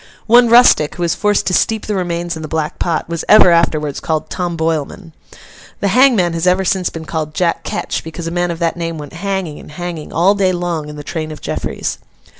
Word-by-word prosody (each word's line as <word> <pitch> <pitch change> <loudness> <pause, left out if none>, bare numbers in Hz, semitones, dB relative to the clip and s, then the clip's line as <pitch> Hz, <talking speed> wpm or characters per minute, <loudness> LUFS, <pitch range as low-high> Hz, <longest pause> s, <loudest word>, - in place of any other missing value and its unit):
One 240 +1 +5
rustic, 235 -10 +5
who 175 - -3
was 170 - +1
forced 210 -1 +1
to 185 - 0
steep 220 +3 +1
the 210 - -2
remains 175 -2 -2
in 160 - -7
the 155 - -5
black 155 -1 -3
pot, 165 -3 -1
was 170 0 -4
ever 210 -4 +7
afterwards 155 -4 +1
called 155 -1 -3
'Tom 175 -2 -3
Boilman.' 160 +2 -3 0.7
The 200 - 0
hangman 225 -7 +4
has 165 +2 -1
ever 185 +1 +2
since 185 -1 +1
been 160 -1 -8
called 155 -1 -4
Jack 175 -3 0
Ketch, - - -3
because 165 +1 -7
a 165 - -3
man 175 0 0
of 170 - -3
that 165 -1 -1
name 165 -1 -4
went 145 0 -9
hanging 190 -3 -3
and - - -13
hanging, 175 -1 -6
all 180 +5 +3
day 190 -2 +1
long, 170 -4 -3
in 150 - -8
the 145 - -8
train 155 +1 -5
of 155 - -8
Jeffreys. - - -4
170 Hz, 225 wpm, -16 LUFS, 160-185 Hz, 0.7 s, ever